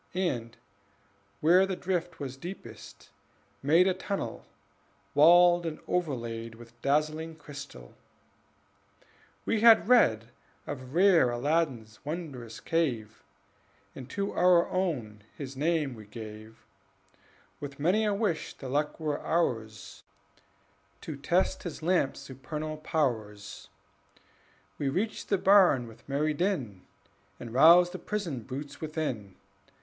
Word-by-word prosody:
And, 125 -12 -2 0.8
where 180 +5 +5
the 190 - -2
drift 175 -2 -3
was 135 -3 -5
deepest, 135 - -10 0.5
made 165 +7 +4
A 190 - +3
tunnel 195 +2 -5 0.7
walled 175 +3 +6
and 160 -2 -4
overlaid 115 -9 -3
With 120 0 -16
dazzling 155 +3 0
crystal: 140 - -11 1.5
we 225 - +1
had 225 -2 +7
read 115 - +4 0.3
Of 130 0 -7
rare 180 -7 +5
Aladdin's 125 -3 -1
wondrous 140 -7 -6
cave, 120 -11 -2 0.7
And 130 -1 -10
to 200 0 -2
our 180 -1 +4
own 130 - -2 0.2
his 135 -2 -7
name 150 -1 0
we 110 -3 -12
gave, 110 0 -10 0.9
With 140 -1 -8
many 185 +9 +2
a 210 - +1
wish 200 -5 -2
the 135 - -8
luck 150 +4 -1
were 150 -2 -2
ours 110 -11 -2 1.0
To 155 - -6
test 170 +7 0
his 165 -2 -7
lamp's 170 -5 +1
supernal 150 +4 -6
powers. 110 -10 -3 1.1
We 140 - 0
reached 205 +10 -3
the 200 - +3
barn 185 -11 +5
with 115 +3 -16
merry 150 +3 0
din, 145 - -2 0.5
And 115 -1 -8
roused 170 +6 +7
the 185 - -7
prisoned 165 - -4
brutes 145 +2 -7
within. 150 - -4
150 Hz, 115 wpm, -29 LUFS, 120-175 Hz, 1.5 s, had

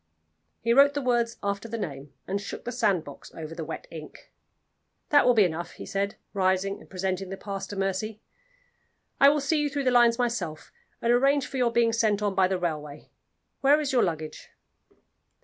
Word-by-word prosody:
He 230 0 +2
wrote 280 +2 +6
the 285 - 0
words 235 -2 +1
after 200 +2 -2
the 230 - -3
name, 140 -8 -6
and 200 +1 -2
shook 200 - -7
the 245 - -3
sandbox 200 - -1
over 160 0 -7
the 165 -1 -5
wet 160 - -6
ink. 155 -2 -11 0.8
"That 290 -3 +5
will 245 - +5
be 215 - +6
enough," 170 -1 -2
he - - -9
said, 200 +1 -2 0.2
rising 190 0 +1
and - - -16
presenting 190 0 -3
the 195 - -5
pass 195 -1 -5
to 205 - -7
Mercy; 195 +3 -2 1.0
"I 275 - +8
will 295 +1 +2
see 300 +2 +1
you 295 - 0
through 285 0 -2
the 255 - +2
lines 240 -1 +5
myself, 225 -11 -2 0.3
and 235 +1 +4
arrange 275 +3 +3
for 270 - -6
your 245 -2 +2
being 230 -1 +3
sent 215 -2 +1
on 205 -1 +1
by 190 -1 +3
the 190 0 -1
railway. 150 -4 -5 0.5
Where 285 +2 +5
is 290 -3 -1
your 250 -2 +3
luggage?" 160 -3 -3
205 Hz, 195 wpm, -27 LUFS, 185-245 Hz, 1.0 s, I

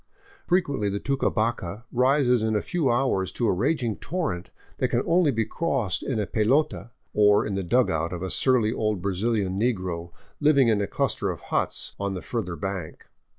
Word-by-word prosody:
Frequently 140 - +1
the 100 +1 -2
Tucabaca 115 -6 -1
rises 125 -1 +3
in 110 0 0
a 105 - 0
few 165 -7 0
hours 120 -7 +1
to 120 - 0
a - - +3
raging 120 - 0
torrent 150 - -3 0.3
that - - +2
can - - 0
only 170 -2 +3
be 115 -4 0
crossed 135 - -1
in 125 -5 -2
a 105 - 0
pelota, 125 +6 +1 0.2
or 105 -1 +4
in 105 - -3
the 95 - -1
dugout 85 -5 +1
of 90 0 -5
a 95 - -3
surly 120 -4 +2
old 105 -3 -1
Brazilian 100 +1 -1
negro 90 -7 -1 0.3
living 140 -5 +4
in 105 -2 +2
a 100 - -1
cluster - - -1
of - - -4
huts - - -2
on 100 -1 -2
the 90 - -6
further 90 -4 -3
bank. 95 -3 -5
110 Hz, 180 wpm, -25 LUFS, 95-130 Hz, 0.3 s, or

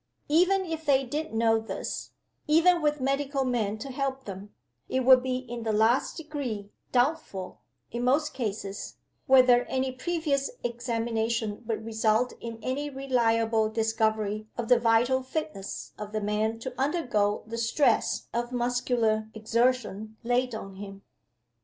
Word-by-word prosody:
Even 365 +5 +4
if 325 -2 -4
they 275 -3 +3
did 305 +5 -3
know 225 0 +3
this 200 -3 -5 0.4
even 335 +3 +5
with 295 -1 +1
medical 275 +1 0
men 220 -4 0
to 270 +5 -7
help 270 0 -2
them 200 +1 -8 0.4
it 260 - +1
would 255 0 +7
be 255 0 -1
in 240 -2 -6
the 225 -1 -1
last 220 +8 +2
degree 270 -11 -5 0.2
doubtful, 245 - -1 0.3
in 240 +1 -3
most 290 +5 +2
cases, 205 -4 -4 0.3
whether 255 -2 +6
any 260 0 -1
previous 280 0 -1
examination 230 -2 -2
would 220 -1 -2
result 220 +2 +1
in 230 -1 -6
any 280 +4 -2
reliable 230 -5 +1
discovery 220 -1 0
of 235 -1 -3
the 245 -1 +6
vital 240 +3 +3
fitness 260 -7 -5
of 210 0 -7
the 215 - 0
man 210 +2 0
to 250 +3 -6
undergo 245 -9 +1
the 230 +1 -5
stress 235 +6 +2
of 240 +1 -2
muscular 240 -3 0
exertion 220 -1 0
laid 245 0 +1
on 195 -3 -8
him. 195 0 -9
240 Hz, 140 wpm, -28 LUFS, 220-265 Hz, 0.4 s, would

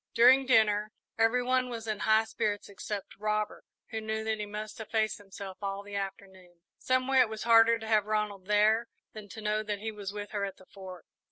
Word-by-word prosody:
During 255 +3 +6
dinner 215 -3 +3 0.3
every 225 +2 +3
one 255 0 +1
was 230 -2 -6
in 215 -2 -3
high 220 +1 +4
spirits 210 -2 -2
except 200 0 -6
Robert, 215 0 -2 0.3
who 220 - -3
knew 220 0 -3
that 220 -1 -1
he 210 - -4
must 210 +3 -7
efface 220 0 -1
himself 195 -1 -9
all 200 0 -3
the 205 0 -9
afternoon. 190 -3 -7 0.2
Some 255 0 +1
way, 265 -1 +4
it 245 -3 +5
was 220 -1 -5
harder 230 0 +6
to 220 -1 -8
have 215 -2 +2
Ronald 210 -3 -2
there 215 +2 +3 0.3
than 210 -2 -10
to 220 +3 -9
know 215 0 0
that 210 -1 -3
he 220 +2 -4
was 205 -2 -6
with 205 0 -7
her 205 -1 -2
at 195 -1 -4
the 185 - -17
Fort. 185 -3 -11
215 Hz, 210 wpm, -30 LUFS, 200-225 Hz, 0.3 s, During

